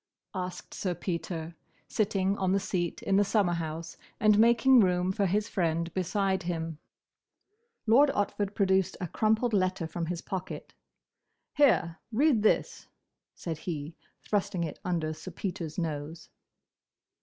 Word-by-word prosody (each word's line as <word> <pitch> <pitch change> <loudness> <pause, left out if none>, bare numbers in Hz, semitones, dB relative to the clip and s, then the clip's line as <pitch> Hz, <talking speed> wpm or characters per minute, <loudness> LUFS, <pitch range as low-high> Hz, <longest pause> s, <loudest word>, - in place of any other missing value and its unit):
asked 180 -2 -5
Sir 180 -3 -2
Peter, 170 -2 -4 0.3
sitting 195 -2 +1
on 190 -1 +2
the 195 - +3
seat 180 -3 -2
in 195 - +2
the 205 - +5
summer 200 -3 +2
house 165 0 -4 0.2
and 210 -1 +5
making 235 +3 +6
room 180 -2 +3
for 195 +1 +1
his 205 +4 +1
friend 170 -4 -1
beside 190 +1 0
him. 165 -3 -3 1.1
Lord 260 +6 +6
Otford 205 0 -1
produced 190 -2 +2
a 180 - -3
crumpled 220 +6 +1
letter 185 -3 +1
from 165 +1 -4
his 170 0 -4
pocket. 185 -1 -6 0.8
"Here! 210 - +3
Read 260 0 +3
this!" 215 - +1 0.5
said 165 -3 -5
he, 155 -2 -5 0.3
thrusting 200 -3 0
it 160 - -5
under 165 -3 -1
Sir 155 +4 -9
Peter's 170 -3 -5
nose. 160 -1 -4
185 Hz, 135 wpm, -29 LUFS, 170-205 Hz, 1.1 s, making